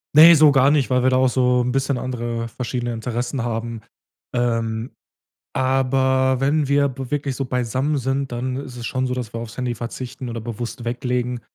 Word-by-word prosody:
Ne, 165 +2 +10
so 150 -1 +7
gar 135 0 +5
nicht, 145 -3 +2
weil 125 0 +3
wir 130 - +4
da 130 - +2
auch 130 0 +4
so 125 -1 +2
'n 125 - 0
bisschen 135 0 0
andere 120 -2 -3
verschiedene 120 0 -3
Interessen 120 +2 -3
haben. 115 -1 -3 0.5
Ähm, 115 -1 -1 0.6
aber 130 0 +2
wenn 145 +1 +1
wir 140 0 +3
b 130 0 -7
wirklich 140 -3 -1
so 135 - -2
beisammen 130 +4 -1
sind, 135 +1 -2
dann 125 +2 -3
ist 135 -3 -7
es 120 -1 -6
schon 130 0 -1
so, 125 - -1
dass 125 -3 -4
wir 115 - -3
aufs 115 -1 -7
Handy 125 -2 -2
verzichten 120 +1 -6
oder 115 -1 -5
bewusst 120 +1 -6
weglegen. 125 0 -2
125 Hz, 190 wpm, -22 LUFS, 120-135 Hz, 0.6 s, Ne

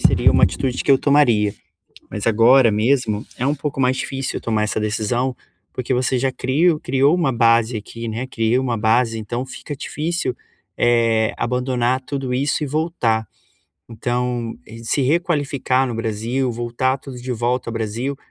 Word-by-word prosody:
seia - - +4
uma - - +3
atitude 130 -2 -1
que - - +1
eu 135 - +6
tomaria. 120 -8 +3 0.6
Mas 105 +2 -5
agora 115 +2 +5
mesmo, 110 -1 +1
é 125 - 0
um 145 - +2
pouco 145 -1 -4
mais 130 0 +2
difícil 135 0 -3
tomar 110 -2 0
essa 105 - -2
decisão, 120 +4 -1 0.4
porque 125 0 -2
você 130 0 +1
já 130 +1 0
crio 150 +6 +1
criou 135 +4 +2
uma 170 -7 +1
base 115 0 +3
aqui, 115 +2 -7
né, 115 +4 -3
criou 120 +1 0
uma 120 -3 -1
base 115 +1 +2
então 120 +4 -4
fica 140 +2 -8
difícil, 165 -1 -3 0.4
eh, 115 -2 +2
abandonar 125 +1 0
tudo 130 -1 -4
isso 140 +3 0
e - - -3
voltar. 135 -7 0 0.6
Então, 120 0 -2 0.3
se 135 +4 0
requalificar 140 -4 +1
no 120 - -4
Brasil, 115 +4 -1
voltar 120 +3 -1
tudo 130 -2 -10
de 125 +1 -4
volta 120 +1 -1
ao - - -3
Brasil, 115 +5 -3
125 Hz, 160 wpm, -20 LUFS, 115-135 Hz, 0.6 s, eu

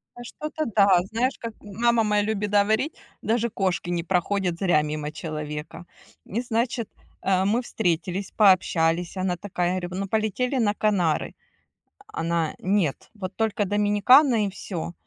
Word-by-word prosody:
А 240 - -9
что-то 305 +5 -5
да. 200 -4 +6
Знаешь, 245 +4 0
как 230 -1 -6
м 205 - -11
мама 235 -1 +4
моя 210 -1 +2
любит 210 -1 -2
говорить: 215 +8 +2 0.3
"Даже 235 +1 0
кошки 185 -4 -1
не 170 -1 -1
проходят 180 0 0
зря 175 -6 +3
мимо 150 0 -4
человека". 155 +1 -6 0.4
И 225 +5 -2
значит, 235 -1 -1 0.3
э, 190 -1 +2
мы 220 +5 +2
встретились, 185 -4 -2
пообщались. 175 -3 +3
Она 185 -1 -1
такая, 180 -2 -2
говорю: 175 -1 -5
"Ну, 195 - -3
полетели 220 +5 0
на 215 -4 +2
Канары". 195 -7 0 0.7
А - - -5
она: 165 -1 -1
"Нет, 185 -6 0
вот 190 -2 -6
только 220 -2 0
Доминикана 210 +5 +4
и - - -2
всё". 175 -3 -6
200 Hz, 150 wpm, -25 LUFS, 175-220 Hz, 0.7 s, да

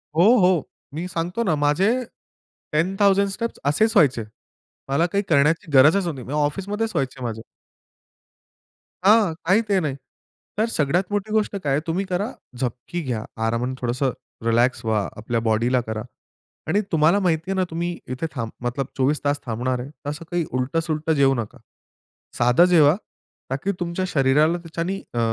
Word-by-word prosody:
हो, 170 - +5 0.2
हो. 180 -5 +3 0.3
मी 170 +4 -4
सांगतो 180 +5 -2
ना 175 -8 +1
माझे 150 +7 +2 0.8
10,000 195 +5 +3
स्टेप्स 230 +4 -4
असेच 215 +11 +3
व्हायचे. 130 -7 +4 0.7
मला 150 +5 +2
काही 200 +4 -1
करण्याची 155 +1 +2
गरजच 155 +8 +5
नाही. 135 -7 -4
म्हणजे 150 +5 -1
ऑफिसमध्येच 200 +9 -2
व्हायचे 135 -2 -2
माझे. 110 -2 -4 1.6
हां. 210 -4 +5
काही 195 +6 +4
ते 195 - +3
नाही. 150 -6 -2 0.6
तर 220 - +3
सगळ्यात 165 +1 +1
मोठी 205 +1 -2
गोष्ट 215 -1 +1
काय 140 - 0
आहे 145 - +1
तुम्ही 185 +4 -1
करा 190 +4 -2 0.3
झपकी 130 +7 -3
घ्या 120 -7 -3 0.2
आरामाने 120 +3 -1
थोडंसं 125 +2 0 0.3
रिलॅक्स 120 +2 +2
व्हा 110 -2 +1
आपल्या 115 +2 -2
बॉडीला 120 +3 +2
करा 110 0 -3 0.7
आणि 205 - +2
तुम्हाला 165 +5 +4
माहिती 175 -1 0
आहे - - 0
ना 190 - +2
तुम्ही 170 +1 -3 0.2
इथे 145 - -4
थांब 115 -2 -3 0.2
मतलब 125 +2 -1
24 140 +3 +1
तास 145 0 +1
थांबणार 125 +2 -2
आहे 125 +3 -6
तर 145 -1 -9
असं 150 +3 -6
काही 175 -2 0
उलटं-सुलटं 155 +5 -1
जेऊ 135 -1 +5
नका. 115 -3 -5 0.8
साधं 125 +8 +5
जेवा 155 0 +6 0.6
ताकी 145 +9 -1
तुमच्या 175 +1 -2
शरीराला 150 +3 +3
त्याच्याने 170 +3 -4
अ, 120 - -1
155 Hz, 155 wpm, -23 LUFS, 130-180 Hz, 1.6 s, जेवा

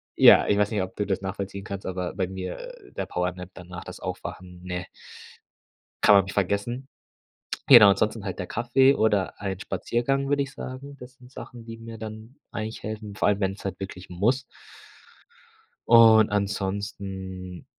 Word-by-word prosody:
Ja, - - +7
ich 100 - +2
weiß 105 0 +3
nicht, 105 -4 0
ob 95 0 -8
du 105 - -2
das 95 -2 -1
nachvollziehen 100 0 -5
kannst, 100 0 -6
aber 90 -1 -3
bei 95 -2 -1
mir, 95 0 -6
äh, - - -11
der - - -4
Powernap 90 0 -3
danach 90 -1 -9
das - - -9
Aufwachen, 90 -1 -7
ne 90 -1 -4 1.2
kann 105 - +7
man 100 -1 +6
mich 95 - -7
vergessen. 100 +7 -1 0.8
Genau, 120 -7 +10
ansonsten 105 +2 +1
halt 95 -3 -4
der 90 - -2
Kaffee 125 +4 +3
oder 105 -6 +1
ein 95 -2 -3
Spaziergang, 135 +6 -1
würde 140 0 +2
ich 135 - -8
sagen. 140 +1 -8
Das 125 0 -11
sind 125 -1 -18
Sachen, 120 -3 -10
die 115 0 -8
mir 115 0 -9
dann 110 +3 -9 0.2
eigentlich 110 +1 -5
helfen, 105 -1 -6
vor - - +1
allem 100 -1 +2
wenn's 95 0 -2
halt 95 -2 -4
wirklich 95 -1 -8
muss. 110 +9 +1 1.5
Und 110 -2 +7
ansonsten 95 -2 -4
100 Hz, 170 wpm, -26 LUFS, 95-115 Hz, 1.5 s, Genau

